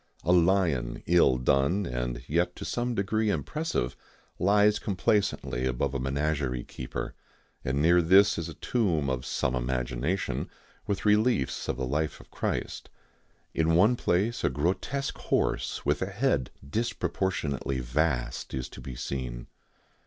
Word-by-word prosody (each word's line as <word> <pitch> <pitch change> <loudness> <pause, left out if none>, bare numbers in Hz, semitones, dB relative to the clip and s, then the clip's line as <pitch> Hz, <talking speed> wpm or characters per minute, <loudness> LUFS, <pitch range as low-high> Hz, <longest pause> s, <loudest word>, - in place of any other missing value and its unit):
A 90 - +2
lion, 85 -9 +2
ill 85 -7 +4
done, 70 +10 +2
and - - -3
yet 85 +3 +1
to - - -7
some 120 0 -1
degree 110 +2 +1
impressive, 85 - -1 0.4
lies 105 +3 +4
complacently 100 - 0
above 65 +2 -1
a 70 - -1
menagerie 70 -1 -1
keeper, 65 - -6 0.5
and 65 +2 -1
near 85 +2 +6
this 95 +4 +5
is 85 0 -4
a 80 - -8
tomb 85 - 0
of 65 -1 -3
some 65 - 0
imagination, 65 +7 -1 0.4
with 100 - -2
reliefs 105 - +2
of - - -1
the 65 - -1
life 75 +4 -1
of - - -17
Christ. - - -3 0.6
In 80 0 +2
one 105 +8 +5
place 110 +3 0
a - - +3
grotesque 95 - -1
horse, - - -1
with 75 0 +1
a 95 - 0
head 100 - 0 0.2
disproportionately 85 - -1
vast, 60 -1 -1
is 65 -2 -4
to - - -11
be 65 - -7
seen. - - -4
80 Hz, 140 wpm, -28 LUFS, 65-100 Hz, 0.6 s, near